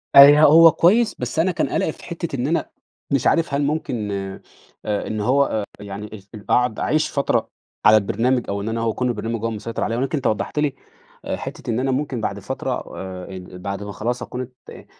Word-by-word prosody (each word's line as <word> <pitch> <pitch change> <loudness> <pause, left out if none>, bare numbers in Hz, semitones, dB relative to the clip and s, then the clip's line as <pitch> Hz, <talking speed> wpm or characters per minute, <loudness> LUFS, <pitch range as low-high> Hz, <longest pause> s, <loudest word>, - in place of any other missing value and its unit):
آآ، - - +11
ي 145 +1 +8
هو 165 +2 +8
كويّس 205 +8 +3
بس - - -3
أنا 180 +3 +3
كان 170 - -1
قلقي - - 0
في - - -15
حِتّة 170 -3 -5
إن 125 0 -1
أنا 165 +2 0 0.4
مش 140 -3 +2
عارف 165 -4 +2
هل 140 - +1
ممكن 135 -8 -2
آآ 95 -1 -5 0.7
إن 110 -1 -3
هو 130 +6 +3
آآ، 110 -5 -2 0.2
يعني 105 +1 -7 0.3
أ 105 - -9
قاعد 125 -3 +2
أعيش 155 0 +1
فترة 140 - 0 0.4
على 110 - +8
البرنامج 115 +5 +1
أو 100 0 -2
إن 105 - -3
أنا 115 0 -2
هو 115 -1 +1
أكون 125 +3 -1
البرنامج 115 0 -3
هو - - +1
المسيطر 115 +1 -4
عليَّ 115 - -1
ولكن 135 +5 -1
أنت 135 - -1
وضّحت 110 +7 -1
لي 145 -2 0 0.5
آآ، - - -2
حِتّة - - -7
إن 115 +1 0
أنا 135 +1 0
ممكن 130 -3 -2
بعد - - -2
فترة - - -4 0.3
آآ، 95 -1 -6
ال 90 -1 -9
بعد 100 +2 -4
ما 105 - -6
خلاص 120 +4 -3
أكون 125 - -5
ات 125 0 -9
آآ - - -12
125 Hz, 220 wpm, -22 LUFS, 105-145 Hz, 0.7 s, آآ